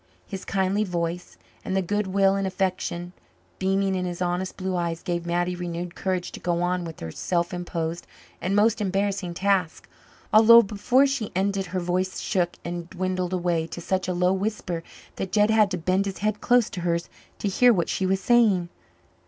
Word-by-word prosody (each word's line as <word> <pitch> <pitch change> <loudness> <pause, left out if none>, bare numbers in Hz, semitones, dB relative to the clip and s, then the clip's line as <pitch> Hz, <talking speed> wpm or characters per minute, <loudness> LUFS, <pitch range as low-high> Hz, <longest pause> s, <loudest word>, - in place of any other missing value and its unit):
His 195 -2 -7
kindly 195 +2 +1
voice 175 -2 -3 0.3
and 190 - -1
the - - +3
good 205 +3 -1
will 195 0 +3
and 195 -1 0
affection 185 -2 -2 0.5
beaming 195 0 +1
in 185 -1 -1
his 175 -1 -4
honest 180 +1 -2
blue 185 -1 -2
eyes 170 -1 -2
gave 170 -1 -2
Mattie 175 +1 0
renewed 175 0 -5
courage 185 -2 -2
to - - -8
go 175 0 0
on 180 0 0
with 165 -1 -9
her 80 - -5
self 175 - -1
imposed 170 -1 -4 0.3
and 185 +2 0
most 215 +1 +3
embarrassing 195 -2 -1
task, 190 -3 0 0.5
although 230 +2 +9
before 225 +6 +2
she 270 -6 -2
ended 195 0 0
her 185 +1 -2
voice 180 +1 -1
shook 175 -2 -1
and 175 0 -5
dwindled 185 0 -2
away 175 -3 0
to 170 - -7
such 185 +2 -1
a 180 - 0
low 180 +1 +2
whisper 190 -4 -2 0.4
that 190 - -4
Jed 210 0 +3
had 215 -2 +4
to 180 - -2
bend 185 +4 +1
his 195 - -4
head 210 +1 -1
close 245 -2 +4
to 180 - -5
hers 170 -1 -1 0.3
to - - -2
hear 245 +5 +5
what 175 -7 +1
she 190 - -1
was 190 0 +1
saying. 205 -6 +3
185 Hz, 190 wpm, -25 LUFS, 175-200 Hz, 0.5 s, although